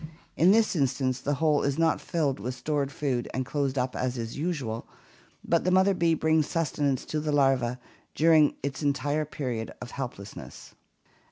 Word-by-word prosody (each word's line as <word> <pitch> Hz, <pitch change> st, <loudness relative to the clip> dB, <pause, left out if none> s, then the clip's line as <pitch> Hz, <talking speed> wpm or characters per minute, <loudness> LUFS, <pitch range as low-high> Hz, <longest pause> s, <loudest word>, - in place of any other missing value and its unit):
In 170 Hz, -, +4 dB
this 215 Hz, 0 st, +4 dB
instance 130 Hz, -3 st, 0 dB
the 145 Hz, -, 0 dB
hole 150 Hz, 0 st, +2 dB
is 140 Hz, -1 st, 0 dB
not 165 Hz, -1 st, +2 dB
filled 145 Hz, -8 st, -1 dB
with 125 Hz, +5 st, -4 dB
stored 140 Hz, +1 st, -1 dB
food 130 Hz, -5 st, -2 dB
and 130 Hz, 0 st, -1 dB
closed 140 Hz, +2 st, -1 dB
up 125 Hz, 0 st, -1 dB
as 125 Hz, 0 st, -2 dB
is 115 Hz, -1 st, -5 dB
usual, 140 Hz, -9 st, -3 dB, 0.6 s
but 170 Hz, -, +2 dB
the 185 Hz, -, +1 dB
mother 190 Hz, +2 st, +4 dB
bee 170 Hz, -3 st, +2 dB
brings 160 Hz, -1 st, +2 dB
sustenance 145 Hz, -5 st, -1 dB
to 155 Hz, -, -2 dB
the 150 Hz, 0 st, -2 dB
larva 135 Hz, -4 st, +2 dB, 0.4 s
during 155 Hz, -2 st, +5 dB
its 140 Hz, +1 st, -3 dB
entire 145 Hz, +1 st, 0 dB
period 125 Hz, -6 st, -4 dB
of 125 Hz, -, -8 dB
helplessness. 120 Hz, -7 st, -8 dB
140 Hz, 170 wpm, -27 LUFS, 130-155 Hz, 0.6 s, during